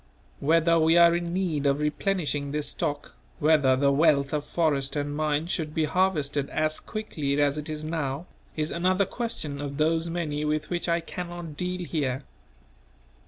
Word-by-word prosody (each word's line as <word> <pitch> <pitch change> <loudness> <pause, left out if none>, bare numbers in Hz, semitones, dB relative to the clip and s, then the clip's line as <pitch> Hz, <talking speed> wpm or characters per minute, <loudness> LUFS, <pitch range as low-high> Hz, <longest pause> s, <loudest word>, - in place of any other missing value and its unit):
Whether 165 +3 +3
we 160 +1 +4
are 170 0 +7
in 170 0 -2
need 170 -6 0
of 140 0 +3
replenishing 150 -2 -1
this 150 +1 -2
stock, 145 0 -3 0.2
whether 150 -4 +4
the 140 +1 +3
wealth 140 -1 +3
of 150 -1 0
forest 145 -5 0
and 145 0 -2
mines 155 +2 0
should 155 -3 -2
be 160 - +2
harvested 150 -5 +1
as 155 0 0
quickly 150 -10 -3
as 145 -1 +3
it 150 - -6
is 155 0 -4
now, 155 -1 -2 0.3
is 155 0 -1
another 185 +3 +2
question 180 -10 -4
of 140 -1 -5
those 160 +2 +1
many 155 -3 -2
with 150 +1 -1
which 175 0 -1
I 170 0 +2
cannot 175 -2 -7
deal 180 +2 -3
here. 140 -5 -2
155 Hz, 165 wpm, -27 LUFS, 145-170 Hz, 0.3 s, are